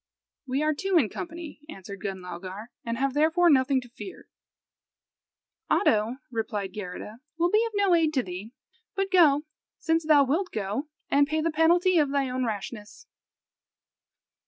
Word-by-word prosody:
"We 265 Hz, +3 st, 0 dB
are 310 Hz, 0 st, +2 dB
two 385 Hz, +4 st, +1 dB
in 250 Hz, -10 st, +3 dB
company," 295 Hz, -, -7 dB
answered 200 Hz, -, -9 dB
Gunlaugar, 190 Hz, +2 st, -6 dB
"and 230 Hz, -2 st, -3 dB
have 270 Hz, +1 st, 0 dB
therefore 325 Hz, +4 st, +4 dB
nothing 265 Hz, -1 st, +3 dB
to 250 Hz, -, -14 dB
fear." 315 Hz, +10 st, -10 dB, 1.4 s
"Oddo," 225 Hz, -, +2 dB
replied 215 Hz, -4 st, -3 dB
Geirrida, 210 Hz, +3 st, -7 dB, 0.2 s
"will 345 Hz, +1 st, +2 dB
be 430 Hz, +2 st, +4 dB
of 455 Hz, -, -10 dB
no 400 Hz, -2 st, +3 dB
aid 325 Hz, -2 st, +3 dB
to 260 Hz, -, +2 dB
thee; 185 Hz, +4 st, -7 dB, 0.4 s
but 390 Hz, 0 st, -1 dB
go, 300 Hz, -6 st, +5 dB, 0.3 s
since 325 Hz, 0 st, +1 dB
thou 305 Hz, -2 st, +5 dB
wilt 325 Hz, +8 st, 0 dB
go, 215 Hz, -, -3 dB, 0.2 s
and 285 Hz, 0 st, +4 dB
pay 310 Hz, +2 st, 0 dB
the 330 Hz, +1 st, 0 dB
penalty 345 Hz, +3 st, +4 dB
of 295 Hz, -2 st, +2 dB
thy 275 Hz, -1 st, 0 dB
own 255 Hz, 0 st, -2 dB
rashness." 215 Hz, -, -6 dB
275 Hz, 155 wpm, -27 LUFS, 215-330 Hz, 1.4 s, go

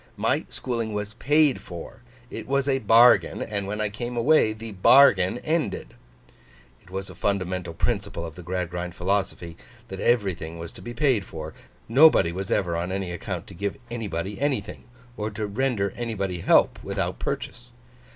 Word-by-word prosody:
My -, -, 0 dB
schooling 115 Hz, -4 st, -2 dB
was 105 Hz, 0 st, -4 dB
paid 145 Hz, +3 st, +2 dB
for; 90 Hz, +6 st, -9 dB, 0.3 s
it -, -, -7 dB
was 140 Hz, +1 st, +1 dB
a 135 Hz, -1 st, +2 dB
bargain; 115 Hz, +2 st, +5 dB
and 100 Hz, -3 st, -3 dB
when 105 Hz, +2 st, -4 dB
I 105 Hz, -1 st, 0 dB
came 120 Hz, +3 st, -5 dB
away, 125 Hz, -2 st, +4 dB
the 110 Hz, +1 st, -7 dB
bargain 95 Hz, -1 st, +5 dB
ended.' 155 Hz, -, -2 dB, 0.9 s
It -, -, -21 dB
was 95 Hz, +1 st, -5 dB
a 95 Hz, -, -10 dB
fundamental 90 Hz, -3 st, -2 dB
principle 100 Hz, -4 st, -2 dB
of 80 Hz, -, -7 dB
the 90 Hz, -, -10 dB
Gradgrind 90 Hz, 0 st, -4 dB
philosophy 95 Hz, -3 st, -2 dB, 0.3 s
that 95 Hz, -, -6 dB
everything 95 Hz, -8 st, 0 dB
was 85 Hz, 0 st, -7 dB
to -, -, -12 dB
be 120 Hz, 0 st, -7 dB
paid 130 Hz, -6 st, +2 dB
for. 80 Hz, -2 st, -8 dB, 0.3 s
Nobody 130 Hz, -, +6 dB
was 95 Hz, +2 st, -5 dB
ever 85 Hz, -4 st, 0 dB
on 85 Hz, +2 st, -2 dB
any 95 Hz, -2 st, -3 dB
account 85 Hz, 0 st, -5 dB
to -, -, -12 dB
give 100 Hz, +3 st, -3 dB
anybody 105 Hz, -2 st, -4 dB
anything, 145 Hz, -2 st, -2 dB, 0.3 s
or 105 Hz, 0 st, -2 dB
render 105 Hz, 0 st, -1 dB
anybody 100 Hz, -7 st, -3 dB
help -, -, +4 dB
without -, -, -3 dB
purchase. 120 Hz, 0 st, -5 dB
100 Hz, 160 wpm, -25 LUFS, 90-120 Hz, 0.9 s, Nobody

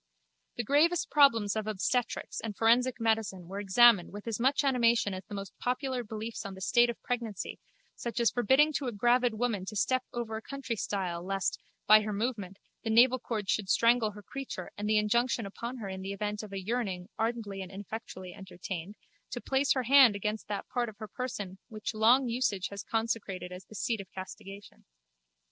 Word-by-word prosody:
The 240 Hz, -, -2 dB
gravest 310 Hz, +8 st, +2 dB
problems 230 Hz, -9 st, +4 dB
of 215 Hz, -1 st, -2 dB
obstetrics 225 Hz, +4 st, -1 dB
and 215 Hz, -3 st, -5 dB
forensic 240 Hz, +2 st, +3 dB
medicine 220 Hz, -6 st, 0 dB
were 195 Hz, +2 st, -5 dB
examined 205 Hz, -1 st, +5 dB
with 205 Hz, 0 st, -9 dB
as 225 Hz, -1 st, -2 dB
much 270 Hz, +4 st, +2 dB
animation 235 Hz, -6 st, +3 dB
as 185 Hz, 0 st, -6 dB
the 210 Hz, -, -8 dB
most 195 Hz, -2 st, -7 dB
popular 255 Hz, 0 st, -1 dB
beliefs 220 Hz, +1 st, -6 dB
on 200 Hz, -2 st, -7 dB
the 190 Hz, -, -11 dB
state 240 Hz, +4 st, +4 dB
of 235 Hz, -, -4 dB
pregnancy 230 Hz, -5 st, -4 dB, 0.4 s
such 235 Hz, -1 st, -4 dB
as 235 Hz, -, +3 dB
the -, -, -30 dB
forbidding 265 Hz, +6 st, +4 dB
to 275 Hz, -, -4 dB
a -, -, -1 dB
gravid 240 Hz, +2 st, +2 dB
woman 220 Hz, -4 st, -1 dB
to 215 Hz, -, -6 dB
step 255 Hz, +5 st, +1 dB
over 230 Hz, -2 st, -4 dB
a -, -, -7 dB
countrystile 205 Hz, -10 st, -3 dB
lest, 195 Hz, 0 st, -1 dB, 0.3 s
by 215 Hz, 0 st, +8 dB
her 215 Hz, 0 st, -3 dB
movement, 205 Hz, -3 st, -3 dB, 0.3 s
the 225 Hz, -, -2 dB
navelcord 235 Hz, -2 st, +3 dB
should 195 Hz, -2 st, 0 dB
strangle 230 Hz, 0 st, +4 dB
her 210 Hz, 0 st, -11 dB
creature 265 Hz, -7 st, -6 dB
and 210 Hz, +1 st, -3 dB
the 215 Hz, -, +4 dB
injunction 230 Hz, +2 st, +1 dB
upon 235 Hz, +6 st, -6 dB
her 215 Hz, -5 st, -6 dB
in 190 Hz, 0 st, -6 dB
the 195 Hz, +1 st, -4 dB
event 210 Hz, +1 st, -3 dB
of 215 Hz, -2 st, -10 dB
a 195 Hz, -, -4 dB
yearning, 195 Hz, -5 st, -2 dB
ardently 225 Hz, -4 st, -2 dB
and 185 Hz, 0 st, -7 dB
ineffectually 195 Hz, -2 st, -7 dB
entertained, 185 Hz, 0 st, -7 dB, 0.3 s
to 245 Hz, -, -4 dB
place 270 Hz, +2 st, +2 dB
her 260 Hz, -, -1 dB
hand 255 Hz, -3 st, +7 dB
against 210 Hz, +2 st, -3 dB
that 205 Hz, -1 st, -4 dB
part 245 Hz, -2 st, -1 dB
of 210 Hz, -, -14 dB
her 215 Hz, -, -7 dB
person 205 Hz, -5 st, -5 dB
which 215 Hz, 0 st, -5 dB
long 240 Hz, +5 st, +4 dB
usage 230 Hz, -6 st, 0 dB
has 200 Hz, 0 st, -6 dB
consecrated 220 Hz, -6 st, -2 dB
as 180 Hz, +1 st, -9 dB
the 215 Hz, -, -14 dB
seat 225 Hz, 0 st, -1 dB
of 190 Hz, -, -14 dB
castigation. 195 Hz, +1 st, -10 dB
220 Hz, 195 wpm, -30 LUFS, 200-245 Hz, 0.4 s, by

